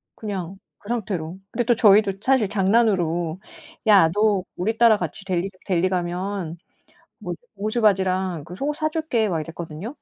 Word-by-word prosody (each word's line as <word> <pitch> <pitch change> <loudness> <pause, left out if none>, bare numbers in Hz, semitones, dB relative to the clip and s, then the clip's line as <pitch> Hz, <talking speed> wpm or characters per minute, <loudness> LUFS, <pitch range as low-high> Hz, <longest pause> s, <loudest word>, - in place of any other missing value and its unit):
그냥 195 -3 -5 0.2
그 205 - -14
상태로. 185 -7 -3
근데 240 - 0
또 240 +1 +3
저희도 210 -2 +5
사실 250 -5 +2
장난으로 185 -5 +1 0.5
"야 195 -6 +7
너 205 -2 +2
우리 220 +6 -1
따라 230 -2 +6
같이 175 +1 -5
델리 185 0 -1 0.2
델리 185 -1 +1
가면 180 -1 -3 0.6
뭐 - - -5 0.2
고무줄 215 +4 -1
바지랑 185 -5 +1
그 175 +4 -10
속옷 290 +8 -2
사 310 -1 0
줄게." 280 -10 0
막 165 -4 -1
이랬거든요. 165 - -7
195 Hz, 305 characters per minute, -23 LUFS, 175-220 Hz, 0.6 s, 야